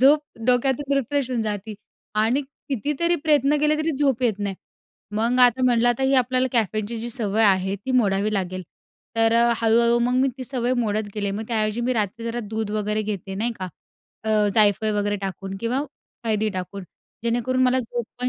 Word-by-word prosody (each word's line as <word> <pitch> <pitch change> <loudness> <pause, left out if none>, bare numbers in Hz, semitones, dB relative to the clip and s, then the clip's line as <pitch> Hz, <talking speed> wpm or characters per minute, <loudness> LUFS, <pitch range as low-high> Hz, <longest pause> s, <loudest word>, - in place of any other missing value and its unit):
झोप 290 +3 +6 0.3
डोक्यातून 265 +3 +1
रिफ्रेश 275 0 -1
होऊन 245 - 0
जाते 210 0 -4 0.5
आणि 250 +5 +2
कितीतरी 290 +4 -2
प्रयत्न 295 -1 +3
केले 300 0 +3
तरी 310 +1 0
झोप 270 -4 +2
येत 220 -4 +1
नाही. 200 -1 -2 0.6
मग 230 +4 +1
आता 250 0 +5
म्हटलं, 240 -1 +3
आता 240 +2 +1
ही 270 +1 +3
आपल्याला 255 0 +2
कॅफेनची 220 0 0
जी 240 +1 -4
सवय 220 -2 0
आहे 190 -1 +3
ती 205 +7 -7
मोडावी 210 -3 +2
लागेल. 185 -1 -2 0.5
तर 225 0 +3 0.2
हळू-हळू 235 +1 +3
मग 245 +1 +1
मी 270 - +3
ती 255 - -5
सवय 250 -1 -1
मोडत 215 -1 -1
गेले. 205 -2 -1
मग 215 +3 -4
त्याऐवजी 215 0 0
मी 250 +2 0
रात्री 225 +1 -2
जरा 235 +1 -2
दूध 220 -1 -2
वगैरे 210 0 -1
घेते 200 -2 -4
नाही 230 +4 -1
का, 185 - -4 0.6
अ, 215 -1 +2
जायफळ 215 0 +3
वगैरे 205 0 0
टाकून 195 0 -6
किंवा 235 +3 0 0.5
हळदी 215 -1 +1
टाकून. 185 +2 -5 0.4
जेणेकरून 245 +2 +1
मला 255 0 +3
झोपपण 245 +1 -4
230 Hz, 175 wpm, -23 LUFS, 210-255 Hz, 0.6 s, झोप